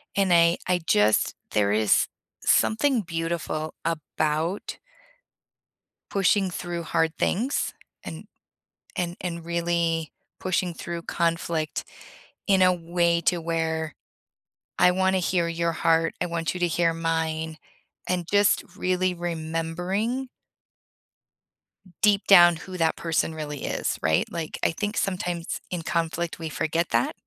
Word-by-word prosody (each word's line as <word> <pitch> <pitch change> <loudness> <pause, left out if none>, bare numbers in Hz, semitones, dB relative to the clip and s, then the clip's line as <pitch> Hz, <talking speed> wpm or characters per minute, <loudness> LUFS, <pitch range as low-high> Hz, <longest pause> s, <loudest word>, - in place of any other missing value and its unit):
and 195 -3 +3
I 170 0 +5
I 180 -1 +2
just 105 -4 +3 0.2
there 100 -1 +2
is 105 0 +3 0.4
something 245 +2 +3
beautiful 165 -2 -3
about 160 +2 -1 1.3
pushing 195 0 +2
through 175 0 -4
hard 160 0 +1
things 250 +8 0 0.3
and - - -7 0.7
and 175 -1 -2
and 170 -2 -4
really 170 -2 0 0.3
pushing 180 -1 0
through 170 0 -5
conflict 165 -2 -1 0.6
in 190 -2 +4
a 185 0 +5
way 170 0 +1
to 175 +1 +1
where 160 -2 -2 0.9
I 180 - +6
wanna 190 +1 +2
hear 175 -1 +1
your 170 0 0
heart, 165 0 +2
I 180 - +1
want 165 -1 -2
you 180 - -6
to 175 - +3
hear 170 0 +2
mine, 160 -1 -2 0.5
and 180 -2 -1
just 205 0 +4
really 185 -1 +1
remembering 175 +9 -2 1.8
deep 205 -1 +4
down 175 -3 +8
who 185 +3 -8
that 165 -2 +1
person 165 -1 0
really 150 -2 -5
is, - - -1
right? 80 0 +2
Like, 165 -2 -4
I - - +2
think 205 +5 -3
sometimes 180 -3 -2
in 175 -2 -2
conflict 165 +1 -2
we 160 -1 -5
forget 165 +3 -1
that 115 +1 +1
170 Hz, 125 wpm, -25 LUFS, 165-180 Hz, 1.8 s, down